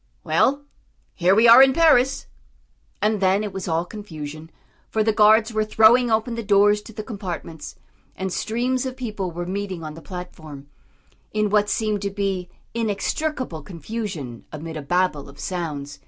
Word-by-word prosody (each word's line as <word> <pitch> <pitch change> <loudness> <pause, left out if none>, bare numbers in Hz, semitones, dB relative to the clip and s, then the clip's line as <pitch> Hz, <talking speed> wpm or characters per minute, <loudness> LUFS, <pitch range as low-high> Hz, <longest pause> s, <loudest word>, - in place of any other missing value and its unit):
Well, 280 +2 +2 0.5
here 185 +2 +3
we 225 +3 +5
are 235 +3 +10
in 270 0 +6
Paris!" 275 -5 +4 0.8
And 210 -1 +1
then 190 +2 +3
it 210 - -5
was 190 -1 -5
all 165 0 0
confusion, 160 -6 -8 0.4
for 220 - +1
the 220 0 +2
guards 220 +2 +5
were 215 0 +1
throwing 220 +3 +5
open 225 +2 0
the 230 - -3
doors 205 0 +4
to 215 - -12
the 215 0 -6
compartments, 180 - -7 0.4
and 190 -1 -4
streams 250 +3 -1
of 260 0 -7
people 210 -7 -4
were 175 +1 -5
meeting 190 -2 -4
on 155 -1 -6
the 165 - -11
platform, 160 -6 -9 0.7
in 215 -1 0
what 205 -1 +3
seemed 215 -2 -1
to 200 - -1
be 195 -2 -2 0.2
inextricable 230 - -2
confusion 165 - -6
amid 160 +2 -7
a 155 - -4
babel 175 -1 0
of 140 - -15
sounds. 150 -6 -5
200 Hz, 165 wpm, -23 LUFS, 170-220 Hz, 0.8 s, are